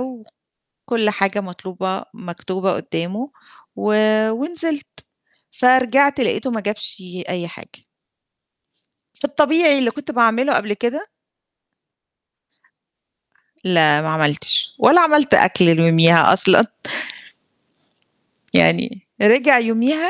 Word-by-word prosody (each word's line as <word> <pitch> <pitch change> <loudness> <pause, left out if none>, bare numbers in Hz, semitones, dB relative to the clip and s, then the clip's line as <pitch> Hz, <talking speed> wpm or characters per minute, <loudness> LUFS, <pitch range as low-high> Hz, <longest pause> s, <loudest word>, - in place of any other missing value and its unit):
وكلّ 250 -4 -12 0.7
حاجة 195 0 -2
مطلوبة 185 +1 -7
مكتوبة 190 -2 -5
قدّامه 205 - -6 0.4
و 215 0 -2 0.4
ونزلت، 305 +4 -4 0.6
فرجعت 260 +3 +2
لقيته 255 +2 -2
ما 220 -2 -4
جابش 210 -2 -5 0.3
أي 175 -1 -5
حاجة. - - -16 1.3
في - - -6
الطبيعي 300 0 +2
اللي 235 -3 0
كنت 295 +3 -9
باعمله 240 +2 +1
قبل 210 -1 -1
كده 245 - -5 2.5
لا 155 -4 +3
ما 160 - -4
عملتش، 150 -2 0
ولا 355 - +5
عملت 300 -4 +3
أكل 175 -2 +4
ليوميها 165 +1 +4
أصلًا. 190 +3 +4 1.9
يعني 90 - +1
رجع 255 +5 +5
يوميها 250 +10 -1
220 Hz, 95 wpm, -18 LUFS, 180-275 Hz, 2.5 s, ولا